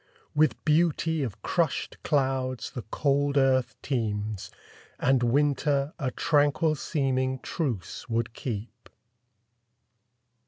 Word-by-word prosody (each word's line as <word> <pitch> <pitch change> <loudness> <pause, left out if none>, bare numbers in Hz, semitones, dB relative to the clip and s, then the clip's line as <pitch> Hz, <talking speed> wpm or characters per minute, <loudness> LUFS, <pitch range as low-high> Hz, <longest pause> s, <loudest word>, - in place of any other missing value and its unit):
With 155 -1 +2
beauty 160 0 +2
of 115 -6 -4
crushed 170 -5 -1
clouds 130 -4 0
the 125 - -5
cold 145 +1 +1
earth 130 -2 +3
teems, 105 -5 -2 0.5
And 130 -1 +3
winter 140 +3 +2
a 135 -4 0
tranquil 145 +3 +2
seeming 130 -3 0
truce 125 - -4
would 115 0 -1
keep. 120 0 -6
135 Hz, 95 wpm, -27 LUFS, 120-145 Hz, 0.5 s, earth